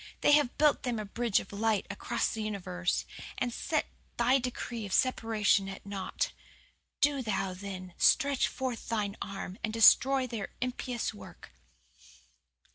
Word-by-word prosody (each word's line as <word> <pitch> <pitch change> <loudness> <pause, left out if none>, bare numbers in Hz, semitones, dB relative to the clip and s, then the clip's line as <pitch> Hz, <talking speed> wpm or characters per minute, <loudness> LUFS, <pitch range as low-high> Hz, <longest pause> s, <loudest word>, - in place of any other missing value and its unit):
They - - +5
have 290 -4 +4
built 300 -1 +4
them 245 -2 -2
a 215 - -4
bridge 230 +1 +1
of - - -10
light 215 0 +1
across 205 - -1
the 225 - -4
universe, 185 -4 -2 0.3
and 245 -1 -1
set - - -1 0.3
Thy 250 +3 +4
decree 240 -2 -4
of 190 - -6
separation 220 -6 +2
at 195 - -9
naught. 200 -2 -3 0.7
Do 285 -1 +3
Thou, 195 -5 -1
then, 185 -1 -7
stretch 280 -3 +4
forth 255 -3 -4
Thine 210 -3 -1
arm 195 -1 -6
and 220 - -1
destroy 255 +4 +6
their 225 -5 -5
impious 250 -2 -3
work. 205 - -13
225 Hz, 145 wpm, -30 LUFS, 200-250 Hz, 0.7 s, destroy